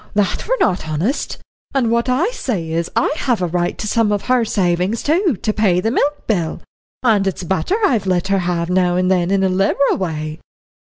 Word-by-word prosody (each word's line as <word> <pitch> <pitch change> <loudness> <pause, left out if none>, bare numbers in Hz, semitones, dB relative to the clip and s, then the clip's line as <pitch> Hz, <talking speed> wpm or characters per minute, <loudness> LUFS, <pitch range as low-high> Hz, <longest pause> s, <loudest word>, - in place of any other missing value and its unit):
That 205 -3 0
were - - +1
not 180 -4 0
honest, 175 - -2 0.4
and 240 -4 +2
what 235 +2 +1
I 315 - +1
say 205 - -3
is, 165 +1 -1
that - - +4
I - - +1
have 245 -4 0
a 180 - 0
right 175 0 -1
to 215 - -4
some 225 -1 +2
of 205 -1 -1
her 255 -1 +2
savin's, 185 0 0
to 330 - +2 0.2
pay 200 -5 +2
the 225 +5 0
milk 290 +3 0
bill 175 -8 -1 0.4
and 210 -5 +3
it's 190 -1 -3
butter 190 - 0
I've 225 - +1
let 185 0 0
her 195 0 +2
have 175 -1 -1
now 180 -1 +2
and 185 +1 +1
then 180 -2 +2
in 195 0 +2
a - - +3
liberal 195 +9 +2
way." 155 -4 -4
195 Hz, 210 wpm, -18 LUFS, 175-235 Hz, 0.4 s, that